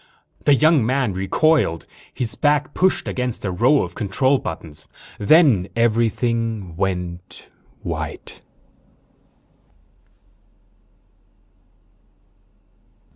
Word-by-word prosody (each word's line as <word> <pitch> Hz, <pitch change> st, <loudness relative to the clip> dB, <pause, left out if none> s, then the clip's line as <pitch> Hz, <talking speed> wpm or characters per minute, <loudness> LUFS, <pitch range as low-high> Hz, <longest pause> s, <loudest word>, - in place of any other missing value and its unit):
The 145 Hz, -, +5 dB
young 155 Hz, -1 st, +4 dB
man 125 Hz, -2 st, 0 dB
recoiled. 95 Hz, -, +1 dB, 0.3 s
His 115 Hz, -4 st, -3 dB
back 145 Hz, -1 st, 0 dB
pushed 185 Hz, 0 st, +1 dB
against 125 Hz, -4 st, -3 dB
a 95 Hz, -, -1 dB
row 125 Hz, +10 st, +3 dB
of -, -, -7 dB
control 130 Hz, +6 st, +1 dB
buttons. 80 Hz, -5 st, -8 dB, 0.3 s
_Then 115 Hz, -, +4 dB
everything 115 Hz, -4 st, 0 dB
went 90 Hz, -1 st, -5 dB, 0.3 s
white. -, -, -6 dB
115 Hz, 80 wpm, -21 LUFS, 95-140 Hz, 0.3 s, The